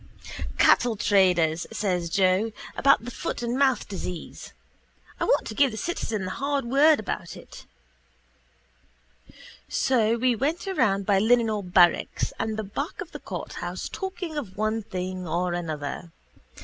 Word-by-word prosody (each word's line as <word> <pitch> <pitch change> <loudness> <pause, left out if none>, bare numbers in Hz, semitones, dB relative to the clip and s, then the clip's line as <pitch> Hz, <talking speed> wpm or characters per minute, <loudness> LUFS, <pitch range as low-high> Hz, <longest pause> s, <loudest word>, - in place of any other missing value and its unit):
—Cattle 240 -2 +4
traders, 180 -6 +2
says 180 -5 -1
Joe, 190 +4 +2 0.2
about 275 -4 +4
the 245 - -5
foot 240 - -4
and 235 +1 -1
mouth 270 -2 +2
disease. 180 -3 -7 0.7
I - - 0
want - - +2
to - - -5
give 275 +5 +4
the 220 - -7
citizen 220 - -3
the 185 - -4
hard 280 +3 -1
word 285 +5 +5
about 215 - -5
it. - - -13 2.0
So 230 -3 +2
we 250 0 +2
went 300 - -1
around 210 - +1
by 195 -1 +3
the 205 - +1
Linenhall 220 -5 +2
barracks 175 -1 +3
and 220 -1 -2
the 220 - -2
back 280 - -5
of 365 -5 -6
the - - -7
courthouse - - -5
talking 365 -5 -5
of 200 -8 -9
one 215 +1 0
thing 185 -2 -5
or 175 +2 -1
another. 160 -1 -4
215 Hz, 150 wpm, -26 LUFS, 185-260 Hz, 2.0 s, word